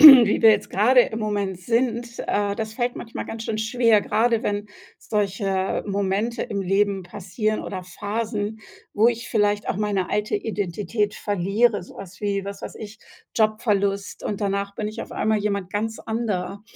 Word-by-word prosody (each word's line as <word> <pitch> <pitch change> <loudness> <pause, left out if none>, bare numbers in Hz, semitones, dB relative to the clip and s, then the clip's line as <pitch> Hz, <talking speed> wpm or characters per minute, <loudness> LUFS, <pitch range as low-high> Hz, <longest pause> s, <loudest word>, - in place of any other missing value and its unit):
wie 265 -8 +10
wir 225 - +9
jetzt 210 -1 +2
grade 250 +6 +5
im 225 -2 0
Moment 205 -4 -1
sind, 235 +3 -1
äh, 205 -1 +1
das 220 -1 -4
fällt 245 0 -1
manchmal 230 - -6
ganz 225 0 -6
schön 220 - -2
schwer, 225 -1 +3
grade 230 0 +2
wenn 205 0 -1 0.3
solche 195 -2 -1
Momente 200 +4 -1
im 200 -2 -3
Leben 195 0 +1
passieren 200 +4 -2
oder 185 -2 -5
Phasen, 210 +3 -3 0.3
wo 220 +3 +5
ich 235 0 -3
vielleicht 205 -1 +1
auch - - 0
meine 205 -3 -1
alte 210 0 0
Identität 205 0 -2
verliere, 205 +2 +1
so 180 - -14
was, 185 -1 -10
wie, 200 -2 -1
was 200 0 -6
weiß - - -6
ich, 220 0 -9 0.4
Jobverlust 205 -3 +1
und 205 0 -3
danach 200 0 -1
bin 210 - -3
ich 215 +2 -5
auf - - -10
einmal 220 0 +1
jemand 200 -3 -2
ganz 220 +2 -2
anderer 205 -4 -3
210 Hz, 170 wpm, -24 LUFS, 200-225 Hz, 0.4 s, wie